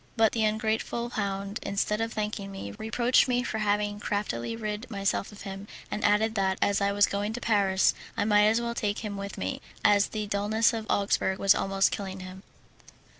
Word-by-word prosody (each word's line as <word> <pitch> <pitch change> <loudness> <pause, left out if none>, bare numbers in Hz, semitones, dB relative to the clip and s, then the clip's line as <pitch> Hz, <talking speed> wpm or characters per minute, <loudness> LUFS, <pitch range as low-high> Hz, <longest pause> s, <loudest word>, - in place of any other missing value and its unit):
But 225 -1 +5
the 225 - 0
ungrateful 220 +2 -1
hound, 200 -1 -3
instead 205 +2 -1
of 225 0 -1
thanking 210 -2 -3
me, 195 - -6
reproached 235 - +2
me 245 -1 +1
for 220 -2 -3
having 205 0 0
craftily 205 - -2
rid 215 +2 -4
myself 200 -1 -1
of 205 - -12
him, 195 +1 -7 0.2
and 210 +1 -3
added 210 +2 +3
that, 190 -3 +1
as 200 0 +2
I 200 0 +2
was 205 0 +4
going 205 +2 -2
to 245 - -4
Paris, 200 -5 +3 0.2
I - - +1
might 210 -1 +5
as 225 +2 +3
well 235 0 -2
take 210 -1 -2
him 205 -1 -4
with 200 0 -6
me, 95 +1 -3 0.2
as 205 0 +5
the 215 -1 -4
dullness 210 +3 +2
of 220 -1 -4
Augsburg 195 -1 +1
was 195 +1 +5
almost 195 0 +1
killing 195 -4 -5
him. 185 +1 -9
205 Hz, 195 wpm, -28 LUFS, 200-220 Hz, 0.2 s, But